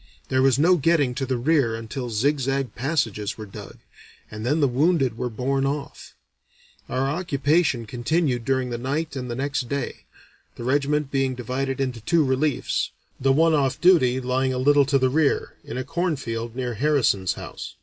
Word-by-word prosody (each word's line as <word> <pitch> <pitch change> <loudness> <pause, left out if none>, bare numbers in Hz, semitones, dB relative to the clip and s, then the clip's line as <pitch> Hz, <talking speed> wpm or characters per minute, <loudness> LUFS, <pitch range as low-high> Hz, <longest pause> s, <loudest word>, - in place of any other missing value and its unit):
There 130 0 +2
was 135 -2 +4
no 175 +5 +4
getting 145 -4 +2
to 135 +1 -3
the 130 -1 0
rear 130 -3 +2
until 120 +3 -5
zig 140 +7 +1
zag 135 0 -1
passages 120 -7 -1
were 110 - -7
dug, 100 - -10 0.5
and 110 0 -6
then 145 +7 +1
the 145 - +4
wounded 135 -1 +2
were 125 +1 -3
borne 135 +4 -1
off. 140 +1 -4 0.7
Our 130 +1 0
occupation 150 -4 +1
continued 125 +2 0
during 130 0 0
the 120 - -3
night 145 +4 -2
and 125 -2 -4
the 120 - -3
next 140 -1 -2
day, 140 -1 -4 0.5
the - - -8
regiment 140 +2 0
being 135 -2 0
divided 130 +2 -3
into 130 -4 -2
two 160 +6 +2
reliefs, 130 +2 0 0.3
the 135 +1 +3
one 160 +4 +4
off 140 -4 +1
duty 145 -9 +4
lying 130 +1 0
a 130 - -2
little 140 +2 +4
to 140 -1 +3
the 130 -1 +2
rear, 150 0 +1
in - - -6
a 130 - -2
cornfield 130 -8 -3
near 125 -2 -2
Harrison's 120 -7 +1
house. - - -8
135 Hz, 180 wpm, -24 LUFS, 125-145 Hz, 0.7 s, was